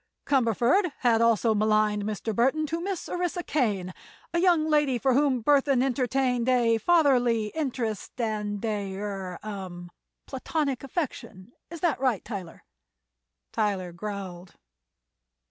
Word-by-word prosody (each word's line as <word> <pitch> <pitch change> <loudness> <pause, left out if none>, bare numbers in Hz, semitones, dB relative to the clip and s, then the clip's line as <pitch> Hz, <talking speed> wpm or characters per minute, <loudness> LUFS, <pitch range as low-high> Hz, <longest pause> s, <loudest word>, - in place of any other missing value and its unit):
"Cumberford 270 - +2
had 230 -3 +3
also 230 -1 +3
maligned 215 -1 +2
Mr. 215 +1 -3
Burthon 265 +8 +2
to 330 +1 -2
Miss 380 -1 -4
Orissa 355 0 -2
Kane, 205 - -1 0.4
a 340 - +2
young 340 -3 +3
lady 295 -4 +2
for 260 +2 +2
whom 265 -3 +2
Burthon 275 -1 +3
entertained 255 -1 0
a 235 -3 +3
fatherly 245 -7 +3
interest 250 -9 -3
and 210 -2 -2
a—er—hum—a 195 -3 -5 0.3
platonic 275 0 -2
affection. 255 - -5 0.2
Is 335 -2 -9
that 335 -7 +1
right, 255 -6 0
Tyler?" 190 -7 -7 0.9
Tyler 200 -5 -1
growled. 185 -1 -7
235 Hz, 115 wpm, -27 LUFS, 205-280 Hz, 0.9 s, had